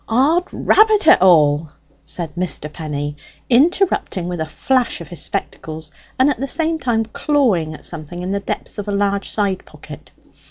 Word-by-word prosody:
"'Od 290 Hz, +10 st, +3 dB
rabbit 430 Hz, -2 st, +4 dB
it -, -, +7 dB
all!" 155 Hz, -4 st, +4 dB, 0.3 s
said 160 Hz, +1 st, -5 dB
Mr. 170 Hz, -4 st, -4 dB
Penny, 145 Hz, -2 st, -4 dB, 0.4 s
interrupting 275 Hz, -, +2 dB
with 175 Hz, -2 st, -4 dB
a 160 Hz, -, -2 dB
flash 250 Hz, +9 st, 0 dB
of 170 Hz, -4 st, -10 dB
his 175 Hz, -4 st, -8 dB
spectacles, 155 Hz, -1 st, -5 dB, 0.3 s
and 260 Hz, -, +4 dB
at 290 Hz, -, 0 dB
the 275 Hz, -, -2 dB
same 325 Hz, +2 st, 0 dB
time 235 Hz, -4 st, 0 dB
clawing 215 Hz, -, 0 dB
at -, -, -10 dB
something 170 Hz, +2 st, -6 dB
in 185 Hz, -, -3 dB
the 200 Hz, -, 0 dB
depths 200 Hz, -, -5 dB
of 205 Hz, -, -5 dB
a -, -, -1 dB
large 200 Hz, 0 st, 0 dB
side 200 Hz, -3 st, -1 dB
pocket. -, -, -12 dB
195 Hz, 170 wpm, -19 LUFS, 160-260 Hz, 0.4 s, it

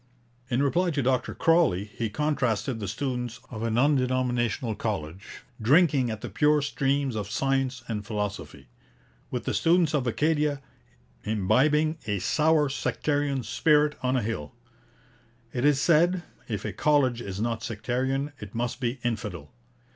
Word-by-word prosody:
' 120 Hz, +1 st, -35 dB
In 130 Hz, +2 st, +1 dB
reply 175 Hz, +6 st, +2 dB
to 145 Hz, -4 st, -1 dB
Dr 130 Hz, 0 st, 0 dB
Crawley 165 Hz, -, +3 dB
he 110 Hz, +2 st, -4 dB
contrasted 130 Hz, -2 st, -1 dB
the 100 Hz, -, -4 dB
students 125 Hz, +1 st, -3 dB
of 110 Hz, -3 st, -6 dB
an 115 Hz, 0 st, 0 dB
undenominational 125 Hz, -4 st, +1 dB
college, 95 Hz, -4 st, -5 dB, 0.2 s
'drinking 140 Hz, 0 st, +4 dB
at 110 Hz, -1 st, -5 dB
the -, -, -5 dB
pure 150 Hz, -1 st, +3 dB
streams 140 Hz, -2 st, 0 dB
of 105 Hz, -2 st, -3 dB
science 135 Hz, +1 st, 0 dB
and 105 Hz, -3 st, -3 dB
philosophy,' 105 Hz, -, -5 dB, 0.6 s
with 125 Hz, -3 st, -3 dB
the -, -, -1 dB
students 170 Hz, -2 st, +3 dB
of 135 Hz, -4 st, 0 dB
Acadia 150 Hz, +2 st, +1 dB, 0.6 s
'imbibing 140 Hz, -, +2 dB
a 105 Hz, -1 st, 0 dB
sour 155 Hz, -, +2 dB
sectarian 145 Hz, -1 st, -1 dB
spirit 150 Hz, +1 st, +2 dB
on 130 Hz, 0 st, +1 dB
a 125 Hz, -, 0 dB
hill.' 90 Hz, -10 st, -4 dB, 1.0 s
'It 120 Hz, -, -2 dB
is 145 Hz, -1 st, +4 dB
said, 175 Hz, +3 st, +3 dB, 0.2 s
if 105 Hz, -4 st, -4 dB
a -, -, -3 dB
college 135 Hz, -6 st, +2 dB
is 100 Hz, -3 st, -6 dB
not 115 Hz, 0 st, -1 dB
sectarian, 130 Hz, +6 st, -2 dB
it 105 Hz, 0 st, -9 dB
must 120 Hz, +1 st, -2 dB
be 125 Hz, +1 st, -1 dB
infidel. 110 Hz, -6 st, -4 dB
125 Hz, 145 wpm, -27 LUFS, 110-145 Hz, 1.0 s, drinking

